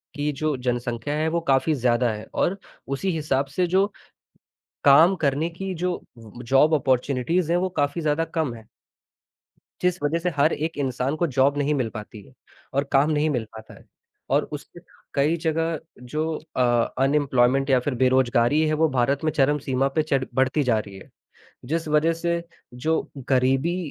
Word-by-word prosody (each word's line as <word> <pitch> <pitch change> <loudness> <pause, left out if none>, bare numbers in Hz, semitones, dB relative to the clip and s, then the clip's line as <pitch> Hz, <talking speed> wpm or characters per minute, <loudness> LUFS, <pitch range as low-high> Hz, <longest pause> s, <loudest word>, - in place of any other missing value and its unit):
कि 145 0 -1
जो 150 +1 -1
जनसंख्या 120 +2 -2
है 155 +1 0
वो 170 +1 0
काफ़ी 135 +4 +3
ज़्यादा 125 -2 +1
है 105 0 -7
और 195 +3 0 0.3
उसी 140 +8 -1
हिसाब 145 -3 0
से 180 - +3
जो 190 +3 +3 1.0
काम 160 +7 +7
करने 145 +3 +1
की 190 +3 -5
जो 180 +1 -1 0.2
उम, 115 +1 -12
जॉब 135 +6 +4
ऑपर्च्युनिटीज़ 140 +5 +1
हैं 175 - +3
वो 185 +1 0
काफ़ी 145 +3 0
ज़्यादा 155 +1 +1
कम 160 -6 -2
हैं। 110 -2 -14 1.1
जिस 180 0 +1
वजह 150 +3 +1
से 175 +2 -2
हर 145 +3 +3
एक 160 +1 -3
इंसान 135 +1 -1
को 170 +2 +1
जॉब 140 +1 +2
नहीं 145 +1 +1
मिल 130 -5 0
पाती 105 -1 -8
है 130 - -19 0.4
और 140 +1 +1
काम 140 +2 +4
नहीं 155 0 +1
मिल 125 -6 -1
पाता 110 0 -12
है। - - -17 0.5
और - - +3
उसके - - -9 0.3
कई 145 +4 +2
जगह 165 0 -1 0.2
जो 155 +6 -2 0.2
अ, 130 - +3 0.4
अनइम्प्लॉयमेंट 135 -1 +2
या 130 - +5
फिर 130 +2 -2
बेरोजगारी 130 +2 +3
है 155 - +1
वो 160 +1 +2
भारत 135 +3 0
में 155 - +2
चरम 145 +1 +2
सीमा 135 -1 0
पे 155 - +4
चढ़ 140 -4 0
बढ़ती 130 +3 +2
जा 120 -4 +2
रही 100 -2 -7
है। - - -15 0.5
जिस 160 +6 -2
वजह 155 +2 +3
से 170 +1 -2 0.4
जो 160 0 +2 0.3
गरीबी 135 +6 +2
145 Hz, 180 wpm, -24 LUFS, 130-160 Hz, 1.1 s, काम